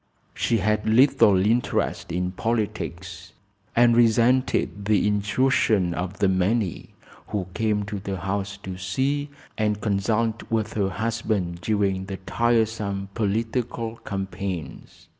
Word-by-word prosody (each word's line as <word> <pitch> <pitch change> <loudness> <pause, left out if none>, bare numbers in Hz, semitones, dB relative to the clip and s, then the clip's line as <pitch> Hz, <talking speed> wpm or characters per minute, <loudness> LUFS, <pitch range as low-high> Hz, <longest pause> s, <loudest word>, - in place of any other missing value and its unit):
She 115 - +1
had 105 +1 0
little 110 -4 +5
interest 120 +3 0
in 90 +1 -1
politics 95 -5 -3 0.4
and 120 0 +5
resented 120 -2 +2
the 105 -1 +3
intrusion 105 -2 +2
of 90 +2 -4
the 100 - +2
many 95 +1 0 0.3
who 100 -3 -2
came 105 -1 0
to 100 0 -5
the 95 -1 -4
house 100 +2 -3
to 95 -1 -6
see 135 +11 -1 0.3
and 105 -1 +1
consult 110 +2 0
with 110 -1 -1
her 100 -3 0
husband 105 -4 -2
during 100 -3 0
the 95 0 -5
tiresome 110 -1 0
political 115 +2 -2
campaigns. 95 -4 -6
105 Hz, 120 wpm, -24 LUFS, 95-115 Hz, 0.4 s, little